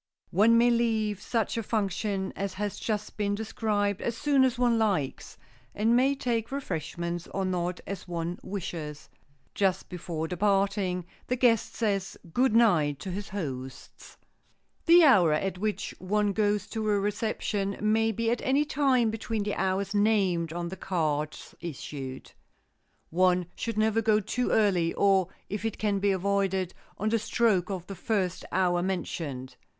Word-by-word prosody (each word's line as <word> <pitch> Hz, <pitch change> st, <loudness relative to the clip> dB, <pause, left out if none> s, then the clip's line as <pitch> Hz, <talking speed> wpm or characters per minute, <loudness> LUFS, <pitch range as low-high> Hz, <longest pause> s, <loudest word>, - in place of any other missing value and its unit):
One 220 Hz, +6 st, +5 dB
may 240 Hz, +1 st, +5 dB
leave 220 Hz, -4 st, +1 dB
such 230 Hz, -2 st, -1 dB
a -, -, 0 dB
function 200 Hz, -2 st, -1 dB
as 195 Hz, -1 st, -3 dB
has 205 Hz, +1 st, -3 dB
just 210 Hz, -2 st, -3 dB
been 205 Hz, -1 st, 0 dB
described 210 Hz, -2 st, -1 dB
as 235 Hz, -1 st, -2 dB
soon 280 Hz, -1 st, +3 dB
as 260 Hz, -1 st, +2 dB
one 240 Hz, -2 st, +3 dB
likes, 190 Hz, -12 st, -1 dB, 0.4 s
and 225 Hz, +3 st, +3 dB
may 265 Hz, +3 st, +3 dB
take 235 Hz, -3 st, -2 dB
refreshments 170 Hz, -, -4 dB
or 195 Hz, -1 st, -2 dB
not 180 Hz, -1 st, -2 dB
as 195 Hz, -1 st, -6 dB
one 170 Hz, 0 st, -3 dB
wishes. 160 Hz, -6 st, -6 dB, 0.4 s
Just 190 Hz, -2 st, 0 dB
before 170 Hz, -3 st, -4 dB
departing 195 Hz, -1 st, +1 dB, 0.2 s
the 250 Hz, -, +1 dB
guest 235 Hz, -3 st, +2 dB
says 200 Hz, -4 st, -1 dB, 0.2 s
good 250 Hz, -2 st, +3 dB
night 165 Hz, -11 st, +4 dB
to 190 Hz, -, -5 dB
his 195 Hz, +2 st, -5 dB
hosts. 135 Hz, -9 st, -7 dB, 0.7 s
The 340 Hz, +1 st, +8 dB
hour 185 Hz, -, +6 dB
at 185 Hz, +4 st, -1 dB
which 215 Hz, +1 st, -2 dB
one 205 Hz, +2 st, +1 dB
goes 205 Hz, -1 st, +1 dB
to 220 Hz, -1 st, -2 dB
a 205 Hz, -1 st, +3 dB
reception 205 Hz, -1 st, -1 dB
may 220 Hz, +2 st, +2 dB
be 230 Hz, +2 st, 0 dB
at 240 Hz, -, -1 dB
any 280 Hz, +3 st, +2 dB
time 260 Hz, -6 st, +2 dB
between 220 Hz, -1 st, -3 dB
the 205 Hz, 0 st, -2 dB
hours 190 Hz, +1 st, -1 dB
named 195 Hz, -6 st, +2 dB
on 170 Hz, +1 st, -3 dB
the 190 Hz, -, -6 dB
cards 155 Hz, -5 st, -2 dB
issued. 135 Hz, -4 st, -7 dB, 0.8 s
One 180 Hz, +1 st, +3 dB
should 230 Hz, -2 st, -4 dB
never 220 Hz, +1 st, +2 dB
go 215 Hz, -1 st, +3 dB
too 245 Hz, +4 st, -1 dB
early, 185 Hz, -6 st, +2 dB
or, 195 Hz, -3 st, +3 dB, 0.2 s
if 205 Hz, +1 st, -4 dB
it 225 Hz, -2 st, -2 dB
can 205 Hz, -2 st, 0 dB
be 200 Hz, +1 st, +2 dB
avoided, 190 Hz, -1 st, 0 dB, 0.2 s
on 215 Hz, -, 0 dB
the 230 Hz, +1 st, +2 dB
stroke 215 Hz, -4 st, +1 dB
of 185 Hz, -3 st, -4 dB
the 195 Hz, -, -7 dB
first 190 Hz, -2 st, -1 dB
hour 180 Hz, -1 st, +2 dB
mentioned. 155 Hz, -8 st, -4 dB
200 Hz, 155 wpm, -28 LUFS, 180-220 Hz, 0.8 s, The